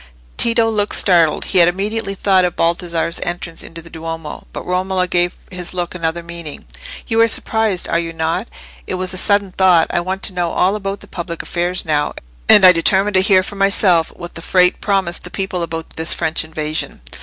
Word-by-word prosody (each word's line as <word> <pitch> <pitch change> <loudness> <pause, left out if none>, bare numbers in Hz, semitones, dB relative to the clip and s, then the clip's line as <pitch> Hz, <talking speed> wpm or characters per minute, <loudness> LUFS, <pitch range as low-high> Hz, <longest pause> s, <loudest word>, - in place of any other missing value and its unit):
Tito 230 -1 +2
looked 210 -2 0
startled; 170 -5 +3
he 185 - +2
had 170 - +6
immediately 195 +3 -2
thought 190 -1 +3
of 180 -1 -1
Baldassarre's 170 0 -1
entrance 175 -1 -5
into 165 0 -7
the 165 - -13
Duomo; 165 -1 -7
but - - -7
Romola 185 0 -1
gave 175 0 +1 0.2
his 180 0 -6
look 175 -1 -3
another 170 -1 -3
meaning. 170 -3 -8 0.4
"You 225 0 +1
are 230 - +5
surprised, 220 -4 0
are 170 - +1
you 165 -1 -3
not? 165 +6 -2 0.4
It - - -3
was 185 0 -2
a - - -1
sudden 200 0 +2
thought. 180 -3 +4
I - - +1
want 190 +2 -4
to 195 - +2
know 175 -2 -2
all 190 +3 +2
about 195 -1 -4
the - - -10
public 170 -1 -6
affairs 175 0 -2
now, 150 -2 0 0.4
and 195 - +8
I 185 - +10
determined 190 +4 +3
to 185 - +4
hear 190 -1 +4
for 200 +1 -7
myself 195 -4 +3
what 175 - -9
the 165 - -7
Frate 180 +1 +2
promised 195 -4 0
the 180 - -1
people 190 -1 -3
about 165 -1 -5
this 160 0 0
French 160 -1 0
invasion." 155 - -3
180 Hz, 200 wpm, -17 LUFS, 170-195 Hz, 0.4 s, I